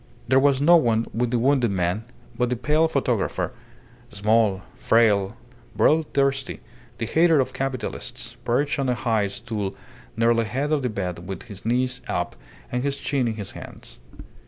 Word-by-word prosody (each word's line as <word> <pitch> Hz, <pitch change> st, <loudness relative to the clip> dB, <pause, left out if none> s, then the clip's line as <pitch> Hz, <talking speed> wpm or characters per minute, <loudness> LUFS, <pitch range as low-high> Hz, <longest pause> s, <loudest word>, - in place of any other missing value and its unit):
There 130 Hz, +1 st, +5 dB
was 140 Hz, -1 st, +3 dB
no 170 Hz, +3 st, +8 dB
one 115 Hz, -6 st, +2 dB
with 120 Hz, +1 st, 0 dB
the 120 Hz, -, +1 dB
wounded 125 Hz, 0 st, +3 dB
man 95 Hz, +3 st, -1 dB, 0.3 s
but 125 Hz, +1 st, 0 dB
the 125 Hz, -, 0 dB
pale 150 Hz, +7 st, +2 dB
photographer, 120 Hz, -, -1 dB, 0.6 s
small, 105 Hz, -1 st, +2 dB
frail, 110 Hz, -2 st, +2 dB, 0.4 s
bloodthirsty, 140 Hz, -3 st, +1 dB, 0.4 s
the 115 Hz, -, -2 dB
hater 160 Hz, +5 st, +4 dB
of 130 Hz, -1 st, 0 dB
capitalists, 125 Hz, -2 st, -4 dB
perched 140 Hz, +5 st, 0 dB
on 135 Hz, -2 st, 0 dB
a 125 Hz, -, +2 dB
high 110 Hz, -4 st, +1 dB
stool 105 Hz, -2 st, -4 dB, 0.4 s
near 115 Hz, +1 st, +4 dB
the 115 Hz, 0 st, +1 dB
head 135 Hz, +7 st, -2 dB
of 150 Hz, -2 st, +2 dB
the 125 Hz, -, -1 dB
bed 90 Hz, -4 st, -4 dB
with 95 Hz, -, -5 dB
his 100 Hz, 0 st, -8 dB
knees 125 Hz, +1 st, +1 dB
up -, -, -2 dB, 0.4 s
and 125 Hz, -, -1 dB
his 140 Hz, +1 st, -1 dB
chin 140 Hz, -4 st, 0 dB
in 110 Hz, -, -2 dB
his 100 Hz, -3 st, -6 dB
hands. -, -, -10 dB
120 Hz, 165 wpm, -24 LUFS, 110-135 Hz, 0.6 s, no